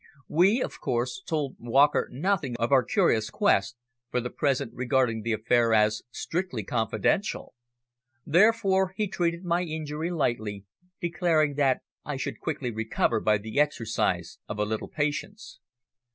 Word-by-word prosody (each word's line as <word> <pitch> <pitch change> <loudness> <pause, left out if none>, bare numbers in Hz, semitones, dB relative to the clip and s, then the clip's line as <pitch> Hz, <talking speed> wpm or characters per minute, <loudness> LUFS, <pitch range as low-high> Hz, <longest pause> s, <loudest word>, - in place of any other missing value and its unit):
We, 195 - +4
of - - -6
course, 125 +5 -1
told 150 -7 -3
Walker 135 +5 +3
nothing 150 -2 -1
of 115 +2 -1
our 135 -2 +6
curious 110 -2 +2
quest, 115 - +2 0.3
for 125 - 0
the 125 0 -4
present 140 -4 0
regarding 125 -3 +1
the 115 +1 -1
affair 115 +1 +2
as 105 0 +3
strictly 160 - -3
confidential. 110 - -1 0.7
Therefore 190 +1 +3
he 215 - +1
treated 170 -1 -1
my 175 0 +1
injury 155 -1 -4
lightly, 110 - -2 0.3
declaring 170 -4 +1
that 135 -3 +2 0.2
I 145 -1 -4
should - - -4
quickly 140 -6 -3
recover 110 +1 0
by 105 0 +2
the 110 +6 -3
exercise 110 - 0
of 105 - -4
a 105 - +1
little 110 +1 -3
patience. 150 - -3
135 Hz, 140 wpm, -27 LUFS, 115-170 Hz, 0.7 s, our